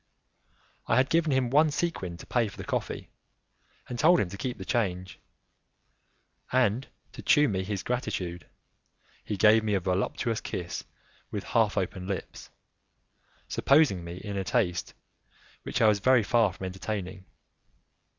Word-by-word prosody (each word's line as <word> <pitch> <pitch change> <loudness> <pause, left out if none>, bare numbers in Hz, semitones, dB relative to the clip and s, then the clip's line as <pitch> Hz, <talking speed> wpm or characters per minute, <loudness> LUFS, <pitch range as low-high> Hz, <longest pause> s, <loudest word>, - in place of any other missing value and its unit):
I - - +3
had 130 +2 +3
given 165 -2 +3
him 130 -2 +1
one 155 +3 +5
sequin 140 - -2
to - - -11
pay 120 -3 +1
for 100 - -11
the - - -6
coffee, - - -4 0.8
and 120 - -5
told 170 +3 +6
him 95 - 0
to 100 - -8
keep 125 +3 -3
the 95 - -8
change, 95 -5 -2 1.3
and, 125 0 +2 0.2
to - - -9
shew 150 0 +5
me 95 -5 -1
his 100 0 -3
gratitude, 90 - -3 0.8
he 105 - -4
gave 110 +3 +5
me 105 -2 +1
a - - +2
voluptuous 95 +5 -1
kiss 85 -1 -5 0.4
with - - -4
half - - +1
open 95 0 -2
lips, 100 -1 -5 1.0
supposing 140 - +3
in - - -9
me 85 +1 -7
a 100 -2 -3
taste 95 -6 -1 0.7
which 120 - -1
I - - +7
was 105 -1 +4
very 125 +2 +4
far 115 +1 +3
from 95 - -7
entertaining. 95 0 -5
105 Hz, 150 wpm, -28 LUFS, 95-125 Hz, 1.3 s, I